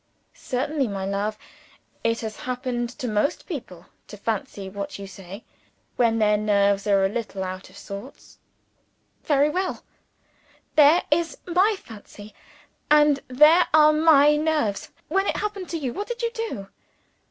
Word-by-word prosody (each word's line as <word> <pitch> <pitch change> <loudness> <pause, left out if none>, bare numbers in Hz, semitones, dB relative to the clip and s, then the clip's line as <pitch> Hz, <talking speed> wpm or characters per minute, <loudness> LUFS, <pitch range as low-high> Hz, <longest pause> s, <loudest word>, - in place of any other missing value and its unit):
"Certainly, 270 +2 -2
my 195 -2 -4
love. 200 +2 -2 0.7
It 230 0 0
has 220 -1 -6
happened 250 -1 -3
to 250 +1 -6
most 215 +8 0
people 225 - -8 0.2
to 210 - -10
fancy 205 -2 -4
what 200 +1 -6
you 200 - -8
say, 195 +2 -11 0.5
when 230 -2 +2
their 210 -1 +3
nerves 200 -1 +2
are 195 -1 +3
a - - +4
little 205 -2 -4
out 185 0 -6
of 195 +1 -14
order." 200 +7 -7 1.1
"Very 290 -2 +3
well. 370 +3 -2 0.9
There 305 +3 +6
is 325 -1 +1
my 370 +5 +2
fancy, 210 -1 -13 0.6
and 295 -1 +5
there 300 +7 +5
are 305 0 +6
my 300 -2 +5
nerves. 300 -10 -1 0.2
When 390 +4 0
it - - 0
happened 405 -3 -4
to 335 - -3
you, 265 -6 -3
what 410 - -5
did 480 0 -5
you 465 - 0
do?" 450 - -5
245 Hz, 150 wpm, -24 LUFS, 200-310 Hz, 1.1 s, There